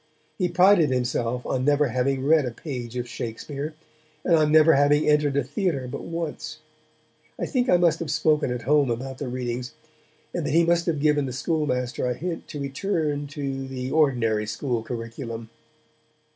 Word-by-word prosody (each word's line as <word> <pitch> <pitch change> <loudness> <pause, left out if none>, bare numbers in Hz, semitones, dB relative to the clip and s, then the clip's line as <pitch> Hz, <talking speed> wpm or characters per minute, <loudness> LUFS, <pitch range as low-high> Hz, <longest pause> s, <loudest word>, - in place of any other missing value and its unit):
He 180 -2 +1
prided 180 -2 +5
himself 125 -1 -1
on 130 - -1
never 145 0 +3
having 130 +2 0
read 155 -1 +4
a - - 0
page 125 -2 -6
of 120 0 -3
Shakespeare, 140 +6 -5 0.5
and 170 - +3
on 155 -1 +3
never 155 +1 +7
having 145 +2 +3
entered 150 -2 +3
a 140 - +2
theatre 140 -1 -2
but 125 - -6
once. 165 -2 -5 0.8
I - - -1
think 250 -2 0
I 180 - +6
must 175 -2 +3
have 165 - -4
spoken 155 -2 +2
at 125 -2 -4
home 145 0 +3
about 130 +3 -4
the 140 - -4
readings, 125 0 -4 0.6
and 175 - -2
that 150 0 -1
he 170 0 +5
must 170 +1 +2
have 160 -3 0
given 145 -1 +2
the - - -4
schoolmaster 125 -4 -1
a 125 - -1
hint 170 +3 -5
to 145 - -7
return 145 0 -2
to 135 -2 -4
the 130 0 -5
ordinary 120 -8 +2
school 120 +1 -2
curriculum. 115 0 -6
140 Hz, 175 wpm, -25 LUFS, 125-155 Hz, 0.8 s, never